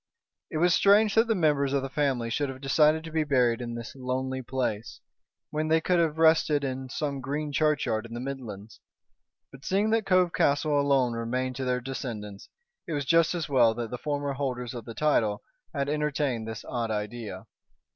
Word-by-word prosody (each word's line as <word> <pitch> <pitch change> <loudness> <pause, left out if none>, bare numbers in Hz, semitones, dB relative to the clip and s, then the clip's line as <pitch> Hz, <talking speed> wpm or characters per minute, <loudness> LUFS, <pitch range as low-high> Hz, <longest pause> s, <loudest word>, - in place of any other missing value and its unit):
It - - -3
was 175 +2 +4
strange 205 +3 +5
that 225 +1 +4
the 225 - +2
members 145 -6 +2
of 140 -1 +1
the - - -2
family 135 -5 -1
should 145 +4 -1
have 130 0 -7
decided 150 +3 +3
to 160 - -8
be 160 0 +1
buried 125 -5 +2
in 120 -1 -5
this 115 -1 -7
lonely 130 0 -3
place, 115 - -3 0.5
when 155 +1 -1
they 160 +1 +4
could 175 +2 +1
have 160 -2 +1
rested 160 -2 +4
in 130 -1 -4
some 140 0 -3
green 145 +3 -3
churchyard 140 -7 +1
in 115 - -9
the - - -4
Midlands. 115 -6 -7 0.7
But, 135 0 -14
seeing 205 +3 +1
that 225 -2 +1
Cove 185 -2 +3
Castle 145 0 +2
alone 135 -4 +2
remained 125 +3 -2
to 135 - -3
their 125 0 0
descendants, 110 -6 -6 0.4
it 165 - -3
was 145 -1 -2
just 165 +3 +3
as 165 -3 -2
well 120 -5 +4
that 115 -1 -4
the 125 - -5
former 145 -1 -2
holders 125 -3 -3
of 120 -3 -7
the 115 - -8
title 115 -9 +1 0.3
had 140 -2 -2
entertained 145 -6 -1
this 110 -1 -7
odd 120 -2 -3
idea. 105 -2 -5
135 Hz, 195 wpm, -27 LUFS, 120-155 Hz, 0.7 s, strange